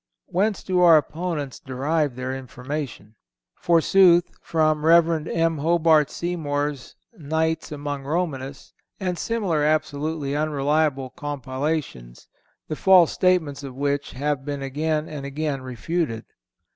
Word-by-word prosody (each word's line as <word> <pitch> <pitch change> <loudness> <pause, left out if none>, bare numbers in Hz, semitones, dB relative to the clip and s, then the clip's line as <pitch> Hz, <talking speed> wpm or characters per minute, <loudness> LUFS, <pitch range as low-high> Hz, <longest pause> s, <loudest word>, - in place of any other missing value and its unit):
Whence 200 +3 0
do 185 -1 0
our 170 -3 +8
opponents 155 -3 -3
derive 140 +2 -1
their 130 +1 -4
information? 130 -3 -6 0.4
Forsooth, 175 +1 +4
from 155 -2 +1
Rev. 165 -1 +4
M. 165 -2 0
Hobart 160 -1 +3
Seymour's 145 -6 -3 0.2
"Nights 160 -1 -2
Among 145 -1 -4
Romanists" 140 -3 -4 0.3
and 185 -3 -2
similar 195 -10 0
absolutely 150 -1 -1
unreliable 145 -2 0
compilations, 135 - -4 0.4
the 155 - -3
false 185 -1 +5
statements 160 -6 +1
of 135 -2 -8
which 140 +1 -2
have 145 +1 -2
been 140 -1 -4
again 150 +3 -1
and 150 -3 -7
again 140 0 -3
refuted. 130 0 -3
150 Hz, 115 wpm, -23 LUFS, 140-165 Hz, 0.4 s, our